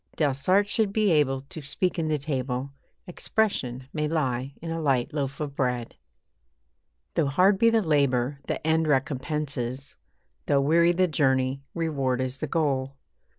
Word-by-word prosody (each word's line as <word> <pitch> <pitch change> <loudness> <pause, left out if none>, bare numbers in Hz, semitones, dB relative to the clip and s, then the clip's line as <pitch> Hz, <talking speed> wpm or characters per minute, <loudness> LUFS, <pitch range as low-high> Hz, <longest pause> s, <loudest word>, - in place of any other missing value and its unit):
Delsarte 150 +7 +2
should 210 -1 +1
be 210 -2 +2
able 135 -4 +2
to 155 +4 -9
speak 170 +6 -1
in 160 - 0
the 155 -1 +1
table 135 -2 -3 0.3
'Expression' 155 - -1
may 150 -1 -1
lie 135 -4 -1
in 165 0 -6
a 165 0 -2
light 135 0 +1
loaf 140 -2 -3
of 145 -2 -4
bread. 125 -3 -2 1.2
Though 160 -4 +1
hard 185 +8 +3
be 230 - +6
the 225 -1 +2
labour, 140 -4 +1
the - - -3
end 160 0 +2
recompenses 135 -2 -2 0.5
Though 140 - +3
weary 170 +4 +4
the 185 +1 +2
journey, 135 -3 +1
reward 140 -6 -1
is 130 +1 -2
the 155 - -3
goal. 140 -3 0
145 Hz, 150 wpm, -26 LUFS, 130-165 Hz, 1.2 s, be